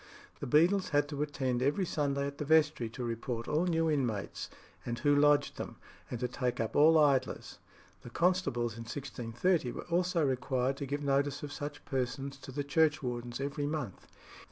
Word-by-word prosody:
The - - -4
beadles 175 +8 +4
had 145 -1 +2
to 145 -1 -4
attend 130 -4 -1
every 145 +8 +1
Sunday 140 -4 -1
at 140 +1 -6
the - - -1
vestry 150 -5 +3
to 125 +2 -6
report 115 0 -3
all 155 +4 +1
new 165 -1 +2
inmates, 125 -10 -1 0.3
and 120 0 -3
who 145 +4 +3
lodged 145 0 +4
them, - - -6 0.3
and 120 - -4
to 125 - +1
take 125 0 -2
up 115 -1 -2
all 160 +2 +7
idlers; 140 -4 +1 0.4
the - - -10
constables 170 - +1
in 115 +1 -8
1630 125 +4 -1
were - - -7
also 175 -2 +2
required 130 0 0
to 140 - -4
give 145 +2 -3
notice 140 +1 +1
of 145 -1 -5
such 145 0 -6
persons 135 +1 -3
to 135 - -10
the 145 +2 -2
churchwardens 135 -6 0
every 140 +1 -2
month. 145 - -4
140 Hz, 180 wpm, -32 LUFS, 125-150 Hz, 0.4 s, all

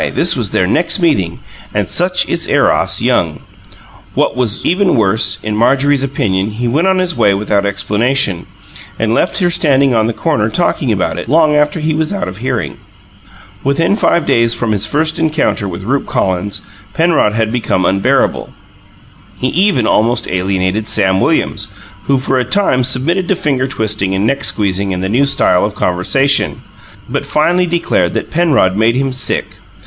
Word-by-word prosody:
this - - +2
was - - -2
their 90 - +1
next 165 - +2
meeting, 95 - 0 0.4
and - - 0
such - - 0
is - - -1
Eros, - - +2
young! - - 0 0.8
What - - 0
was 125 -4 -2
even 185 0 +2
worse, 110 -1 +2
in 105 0 -3
Marjorie's 135 +5 +2
opinion, 105 -8 -1
he 115 +3 -4
went 150 +10 +1
on 190 0 +2
his 185 -1 -1
way 105 -4 +2
without 100 0 0
explanation, 105 0 0 0.5
and 115 0 0
left 170 - 0
her 180 -3 +1
standing 140 -5 +2
on 110 -1 +2
the - - -1
corner - - -1
talking - - -1
about - - -1
it, - - -7
long 155 +1 +3
after 150 +1 +1
he 155 0 -1
was 155 +2 -1
out 200 - -3
of 95 +1 -7
hearing. 125 +1 -3 0.9
Within 165 +8 +1
five 170 -6 +1
days 115 0 +2
from 115 -2 -1
his 105 0 0
first 155 +6 0
encounter 155 -10 0
with 95 - -7
Rupe 135 +7 -2
Collins, 95 +2 -2 0.3
Penrod 160 -10 +2
had 110 0 -1
become 115 -6 -1
unbearable. 95 +1 0 0.9
He 130 - -1
even 180 - +1
almost 115 +3 +1
alienated 95 +3 -1
Sam 95 0 +2
Williams, - - 0 0.4
who 140 - +2
for 130 0 0
a - - +1
time 160 -8 +1
submitted 145 +9 +1
to 195 - +1
finger 135 -6 -1
twisting 105 -6 -2
and 95 +2 0
neck 140 +5 0
squeezing 100 -2 -1
and 90 - -4
the 95 - -2
new 130 +6 +2
style 90 -9 +2
of 105 -1 -2
conversation, 135 +11 +1 0.4
but - - -3
finally 175 +4 +1
declared 165 - 0
that - - -4
Penrod 155 - +2
made 110 +3 +2
him 135 0 -1
"sick." 130 - -1
125 Hz, 175 wpm, -14 LUFS, 100-150 Hz, 0.9 s, long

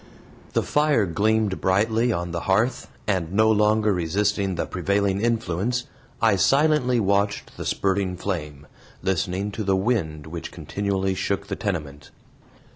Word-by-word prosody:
The - - +2
fire 150 -7 +2
gleamed 105 +3 +1
brightly 110 +5 +2
on 85 -4 -2
the 85 - -2
hearth, 115 +6 +1 0.2
and, 90 -5 -1
no 110 +3 +4
longer 105 0 +3
resisting 95 +3 0
the - - -1
prevailing 100 +2 0
influence, 115 +1 0 0.4
I 110 -4 +3
silently 135 - +3
watched 100 0 0
the - - -5
spurting 95 -2 0
flame, 75 -7 -4 0.4
listening 95 +2 -1
to 110 - -4
the 95 -1 +2
wind 95 -8 -1
which 80 +1 -7
continually 95 -1 -2
shook 100 +1 -2
the 95 - -2
tenement. 75 -10 -4
100 Hz, 135 wpm, -24 LUFS, 90-110 Hz, 0.4 s, no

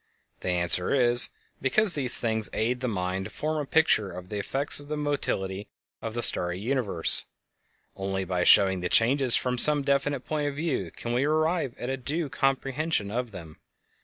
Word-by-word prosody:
The - - -5
answer 90 0 +1
is: 120 -2 +5 0.3
Because 195 +9 +3
these 130 -4 +7
things 110 -2 -1
aid 120 +3 -2
the 130 - -4
mind 95 -3 -4
to - - -8
form 155 0 -4
a 145 - -7
picture 155 -11 +1
of 90 +1 -11
the 105 - -5
effects 135 +9 -1
of 145 - -13
the 150 0 -5
mobility 105 -10 -4 0.3
of 115 0 -7
the 120 - 0
starry 90 +1 +3
universe. 110 -7 +2 0.7
Only 95 0 -4
by 90 -1 -2
showing 95 0 +4
the 90 - -3
changes 130 +2 +2
from 125 -1 -1
some 150 0 +4
definite 140 0 -1
point 150 -1 -3
of 145 - -5
view 155 -1 -3
can 120 - -7
we 125 +2 0
arrive 155 -3 -1
at 125 - -5
a 135 - -4
due 145 +4 -4
comprehension 135 -3 -2
of 125 +2 -4
them. 85 -6 -12
125 Hz, 185 wpm, -25 LUFS, 95-145 Hz, 0.7 s, these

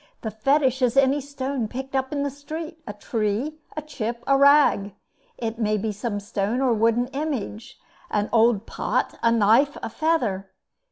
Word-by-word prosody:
The 220 - -4
Fetish 265 +3 +1
is 250 0 +2
any 275 +1 +4
stone 270 -3 -3
picked 265 +4 -6
up 265 0 0
in 285 -1 -1
the 285 - -2
street 315 +4 -7
a 205 - -5
tree, 220 +8 -2 0.2
a 305 - -3
chip, 240 -5 -5
a 275 - +4
rag. 280 -8 +4 0.4
It 230 -1 -4
may 215 -1 +1
be 215 +1 -2
some 205 0 -3
stone 205 +3 -2
or 260 -3 +2
wooden 230 +2 +2
image 270 -7 -4 0.3
an 210 0 0
old 230 -2 +3
pot, - - -2
a 230 - +3
knife, 230 +6 +4
a - - -3
feather. 230 -12 0
240 Hz, 170 wpm, -24 LUFS, 215-280 Hz, 0.4 s, any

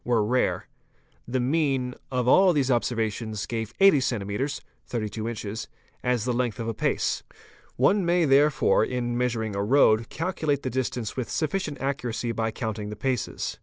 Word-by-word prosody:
were 115 -3 +2
rare. 125 +4 +1 0.6
The 130 +2 -1
mean 135 -2 +1 0.2
of 125 -1 0
all 185 +7 +6
these 140 -3 +1
obser 120 0 +1
vations 110 -1 -2
gave 115 -1 -3
80 195 -7 +7
cms. 125 +2 -2 0.3
(32 110 -1 -3
in.) 110 -3 -4 0.5
as 125 -3 +1
the 125 - 0
length 120 -1 -1
of 115 - -3
a 115 - -1
pace. - - 0 0.5
One 190 - +3
may 175 0 +3
therefore 140 -3 +4
in 120 0 -2
measuring 115 -4 -1
a 100 - 0
road 110 -2 +4
calculate 155 -5 -1
the 130 - -2
distance 125 -3 -2
with 125 -3 -3
sufficient 155 -2 -2
accuracy 125 -4 -2
by 115 0 -1
_ - - -22
counting 110 -3 -4
the 105 - -5
paces. 130 +1 -2
125 Hz, 165 wpm, -26 LUFS, 110-140 Hz, 0.6 s, 80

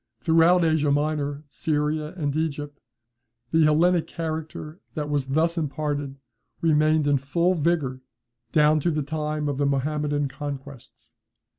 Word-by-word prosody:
] 115 - -55
Throughout 165 +5 +4
Asia 155 -2 +2
Minor, 145 0 0
Syria, 150 +2 -1
and 145 -4 -1
Egypt, 145 -2 -3 0.7
the 160 -1 +4
Hellenic 165 +3 +3
character 160 0 -5 0.2
that 150 -1 -3
was 140 -2 0
thus 165 +5 +1
imparted, 145 -2 -3 0.4
remained 155 -1 +3
in 145 -1 +3
full 170 +7 +1
vigour 150 -6 0 0.5
down 155 0 +4
to 160 - 0
the 155 -2 -1
time 150 0 -2
of 140 -1 -2
the 145 - +2
Mahometan 145 +1 0
conquests. 140 -2 -9
150 Hz, 135 wpm, -25 LUFS, 145-160 Hz, 0.7 s, Throughout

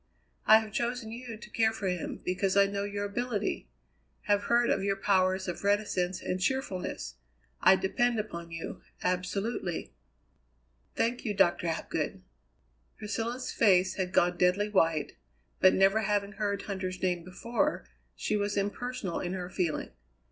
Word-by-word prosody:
I 220 - +10
have 220 -1 -8
chosen 240 -1 -2
you 235 -1 -7
to 215 -1 -12
care 220 -1 +3
for 215 -3 -4
him, 180 -2 -3
because 185 +2 +1
I 200 - +7
know 200 0 -2
your 205 0 -3
ability; 215 0 -2 0.6
have 205 0 +2
heard 240 0 +3
of 195 - +1
your 195 0 +1
powers 190 -1 +2
of 180 - -4
reticence 190 -3 0
and 185 0 -2
cheerfulness. 195 - -2 0.4
I 190 - +7
depend 230 +6 +1
upon 170 -5 -5
you 165 0 -6 0.2
absolutely." 180 +1 -2 1.0
"Thank 240 +2 0
you, 210 -4 -2
Doctor 175 -3 +3
Hapgood." 165 - -2 0.7
Priscilla's 230 +4 -3
face 190 -4 +4
had 185 -2 -2
gone 175 0 +3
deadly 185 +4 +3
white, 165 -6 +1 0.4
but 185 - +6
never 195 +3 +4
having 205 -1 0
heard 200 -1 -2
Huntter's 185 -2 -4
name 180 -2 +1
before, 185 - -1 0.3
she 65 - -1
was 205 0 -1
impersonal 205 -1 -2
in 180 0 -3
her 180 -1 -5
feeling. 170 -4 -1
200 Hz, 150 wpm, -30 LUFS, 185-215 Hz, 1.0 s, I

